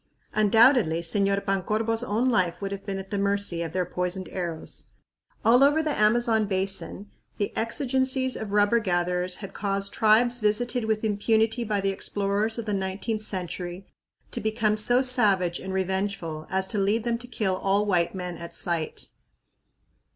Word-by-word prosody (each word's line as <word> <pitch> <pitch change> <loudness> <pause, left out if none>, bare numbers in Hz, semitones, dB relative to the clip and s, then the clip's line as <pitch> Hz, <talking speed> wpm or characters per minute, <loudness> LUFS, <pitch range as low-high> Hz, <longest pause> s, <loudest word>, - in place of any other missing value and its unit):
Undoubtedly, 215 - +4
Señor 200 +3 0
Pancorbo's 215 +4 0
own 235 +2 0
life 185 -8 +1
would 195 -1 -4
have 200 +1 -6
been 195 -1 -2
at 195 +1 -8
the 205 - -1
mercy 200 -3 0
of 165 -2 -3
their 180 +1 0
poisoned 180 +1 -3
arrows. 170 -4 -3 0.6
All 245 +4 +6
over 295 +3 +4
the 310 - 0
Amazon 220 0 +3
Basin 195 +1 -3 0.3
the 205 - -2
exigencies 260 +2 0
of 215 -2 -5
rubber 205 +3 +4
gatherers 180 -2 0
had - - -11
caused 200 -1 -2
tribes 235 +3 +4
visited 235 +3 0
with 220 0 0
impunity 220 +2 +1
by 210 -3 -1
the 195 0 +1
explorers 205 +3 -1
of 230 - -4
the 210 - -2
nineteenth 195 +3 -2
century 180 -2 -5 0.5
to - - -3
become 220 -1 +1
so 245 +4 +2
savage 200 -9 +2
and 190 - -6
revengeful 190 -4 -2
as 190 0 0
to 210 - 0
lead 205 +3 +1
them 235 -1 -1
to 245 - -8
kill 195 -6 -1
all 200 +2 +1
white 180 -3 +1
men 180 -2 -5
at 170 0 -9
sight. 170 -3 -3
205 Hz, 165 wpm, -26 LUFS, 190-225 Hz, 0.6 s, All